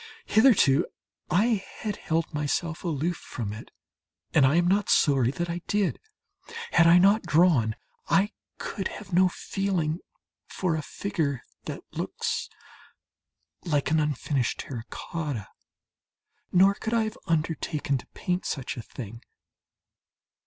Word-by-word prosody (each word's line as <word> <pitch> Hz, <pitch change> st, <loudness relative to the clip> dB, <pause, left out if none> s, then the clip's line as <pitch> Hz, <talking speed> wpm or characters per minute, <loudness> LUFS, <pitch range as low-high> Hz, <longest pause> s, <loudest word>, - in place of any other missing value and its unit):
Hitherto 200 Hz, -, +5 dB, 0.4 s
I 210 Hz, +2 st, +2 dB, 0.2 s
had 210 Hz, -2 st, -2 dB
held 165 Hz, +1 st, -1 dB
myself 155 Hz, +3 st, -1 dB
aloof 165 Hz, 0 st, -1 dB
from 105 Hz, -4 st, -5 dB
it, 110 Hz, -, -9 dB, 0.6 s
and 140 Hz, -4 st, +6 dB
I 140 Hz, -, +3 dB
am 175 Hz, 0 st, +3 dB
not 200 Hz, +1 st, +2 dB
sorry 135 Hz, -5 st, +4 dB
that 170 Hz, +6 st, -2 dB
I 170 Hz, +1 st, -3 dB
did. 205 Hz, -2 st, +1 dB, 0.7 s
Had 165 Hz, -, +6 dB
I 170 Hz, +1 st, +8 dB
not 200 Hz, +4 st, +5 dB
drawn, 150 Hz, -10 st, +3 dB, 0.3 s
I 200 Hz, +2 st, +3 dB, 0.3 s
could 195 Hz, -, -3 dB
have 195 Hz, -3 st, -9 dB
no 185 Hz, +1 st, +5 dB
feeling 180 Hz, -4 st, -1 dB, 0.5 s
for 180 Hz, -4 st, -1 dB
a 155 Hz, -, -2 dB
figure 150 Hz, -6 st, -2 dB, 0.2 s
that -, -, -6 dB
looks -, -, -3 dB, 1.1 s
like 150 Hz, -3 st, 0 dB
an 160 Hz, -, +4 dB
unfinished 145 Hz, -3 st, 0 dB
terracotta, 135 Hz, -, -5 dB, 1.0 s
nor 195 Hz, +2 st, +6 dB
could 220 Hz, +3 st, -3 dB
I 230 Hz, -, +3 dB
have 215 Hz, 0 st, -5 dB
undertaken 155 Hz, -3 st, 0 dB
to -, -, -14 dB
paint 180 Hz, 0 st, -1 dB
such 135 Hz, -2 st, -3 dB
a -, -, -4 dB
thing. 115 Hz, -1 st, -9 dB
165 Hz, 130 wpm, -27 LUFS, 140-190 Hz, 1.1 s, I